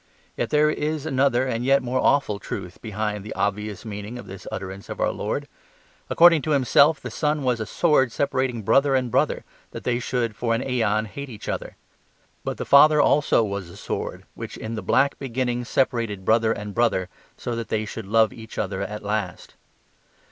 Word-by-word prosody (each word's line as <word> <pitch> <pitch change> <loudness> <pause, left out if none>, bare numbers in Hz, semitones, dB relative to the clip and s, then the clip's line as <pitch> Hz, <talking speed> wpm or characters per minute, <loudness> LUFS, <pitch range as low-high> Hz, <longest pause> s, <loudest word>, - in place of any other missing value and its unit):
Yet 120 - -2
there 150 0 +4
is 155 0 -2
another 135 -3 +2
and 120 -2 -2
yet 135 +1 +3
more 125 +1 -1
awful 120 -9 +2
truth 95 -3 -7
behind 105 -2 -3
the 105 - -7
obvious 105 0 -2
meaning 105 +2 -6
of 120 - -9
this 95 0 -10
utterance 95 +1 -6
of - - -6
our - - +2
Lord. - - -3 0.6
According 170 -2 +6
to 155 - -2
Himself 140 +2 +4
the - - -7
Son 150 -1 0
was 125 -2 +1
a 110 - -4
sword 150 -7 +2
separating 130 -4 -1
brother 135 +6 +3
and 125 -2 0
brother - - +1 0.3
that - - -8
they 120 -1 0
should 120 -2 -2
for 115 +1 0
an 120 - -2
aeon 110 -4 +1
hate 140 +6 -7
each 110 -4 -10
other. - - -4 0.7
But - - -3
the - - -4
Father 150 +2 +7
also 145 -5 +4
was 100 -4 -4
a - - -12
sword, - - -4
which - - -7
in 110 +1 -5
the 110 - -3
black 140 +1 +2
beginning 125 -2 -2
separated 115 -7 0
brother 110 +1 +3
and 105 -2 -4
brother, 105 -6 +1 0.3
so 120 - -4
that 115 -1 -4
they 110 0 -1
should 105 -1 -7
love 110 0 +3
each 110 -1 -11
other 95 -1 -2
at 105 +2 -5
last. 105 +1 -3
115 Hz, 190 wpm, -24 LUFS, 105-135 Hz, 0.7 s, Father